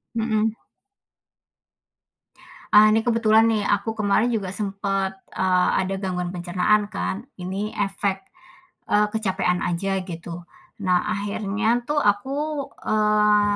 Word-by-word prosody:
Mhm. 220 -1 0 2.2
Ah, 210 +1 +8
nih, 220 +1 +3
kebetulan 225 -1 +4
nih, 210 -2 0
aku 205 +2 +1
kemarin 210 +3 +2
juga 210 -5 -1
sempet, 195 -1 -2 0.2
eee, 185 -1 +2
ada 190 - -4
gangguan 180 -2 -3
pencernaan 180 +4 +1
kan, 205 +3 -4
ini 195 +4 -4
efek, 195 -1 -1 0.6
eee, 210 0 +3
kecapean 190 -4 0
aja, 190 +3 -1
gitu. 170 0 -8 0.4
Nah, 180 -1 +2
akhirnya 210 +3 -1
tuh 295 0 +1
aku, 280 +7 -1
eee, 210 -1 +3
205 Hz, 110 wpm, -23 LUFS, 190-220 Hz, 2.2 s, Ah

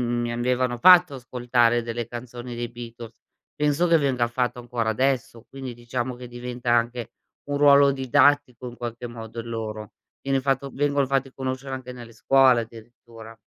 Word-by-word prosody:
mi 120 -1 -1
avevano 125 +1 0
fatto 180 0 +7
ascoltare 120 -2 +1
delle 115 0 -4
canzoni 120 0 -8
dei 120 0 -4
Beatles. 115 -1 -10 0.4
Penso 150 +3 +1
che 170 - +5
venga 130 -4 0
fatto 125 +1 -2
ancora 120 -2 -2
adesso 125 -1 -1
quindi 135 -2 -7
diciamo 120 +1 -4
che 125 0 -10
diventa 120 0 -4
anche 120 0 0 0.4
un 145 - 0
ruolo 140 -1 +6
didattico 135 -1 +2
in 120 - -11
qualche 120 0 -6
modo, 115 -1 -8
il 115 - -9
loro. 110 -2 -6 0.3
Viene 135 -1 +1
fatto 135 +1 -1
vengono 145 -1 +1
fatti 135 0 -1
conoscere 130 0 -5
anche 125 -1 -7
nelle 120 -2 -11
scuole, 130 +1 +4
addirittura. 115 0 -13
120 Hz, 160 wpm, -24 LUFS, 120-135 Hz, 0.4 s, fatto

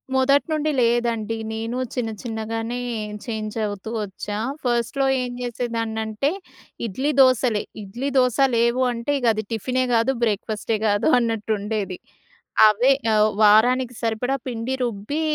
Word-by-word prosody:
మొదటి 275 +2 +3
నుండి 310 0 0
లేదండి. 230 -2 +1 0.2
నేను 225 +3 -3 0.2
చిన్న 240 -3 -2
చిన్నగానే 225 +1 -3 0.5
చేంజవుతూ 215 -2 -4
వచ్చా. 205 +1 -5 0.3
ఫస్ట్‌లో 245 +3 0 0.2
ఏం 250 - -3
చేసేదాన్నంటే 230 +1 -2 0.5
ఇడ్లీ, 260 +8 -1
దోసలే. 250 -4 +3 0.2
ఇడ్లీ, 240 +8 -4
దోస 250 -3 +3 0.2
లేవు 235 +2 +2
అంటే 235 +3 -3
ఇగది 225 -3 +1
టిఫినే 255 +4 0
గాదు, 235 +3 +3
బ్రేక్‌ఫా‌స్టే 215 0 -1
గాదు 205 +6 +2
అన్నట్టుండేది. 215 -4 -2 0.7
అవే 235 +6 +3 0.2
ఆహ్, 215 0 +4
వారానికి 245 +4 +5
సరిపడా 230 +4 0
పిండి 245 +1 -3
రుబ్బి, 240 +6 -2
230 Hz, 115 wpm, -23 LUFS, 215-250 Hz, 0.7 s, వారానికి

